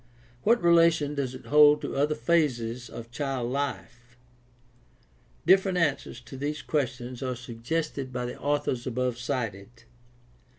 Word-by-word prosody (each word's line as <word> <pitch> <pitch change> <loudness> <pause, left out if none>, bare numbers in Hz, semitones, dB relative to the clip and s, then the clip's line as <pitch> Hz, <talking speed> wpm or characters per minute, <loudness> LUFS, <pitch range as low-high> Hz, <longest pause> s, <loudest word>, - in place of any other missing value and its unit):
What 235 0 +3
relation 165 -3 +4
does 135 -3 -3
it 130 - -11
hold 150 0 +6
to - - -4
other 145 +2 +1
phases 120 -5 0
of 115 +1 -9
child 130 -2 -2
life? 125 -3 -5 1.3
Different 190 -1 +4
answers 155 -5 0
to 135 - -10
these 145 +3 -3
questions 125 -4 -2
are 130 -1 -2
suggested 130 +4 -4
by 125 -1 -3
the 120 - -6
authors 140 -4 -1
above 125 -1 -1
cited. 115 -3 -4
130 Hz, 130 wpm, -27 LUFS, 120-150 Hz, 1.3 s, hold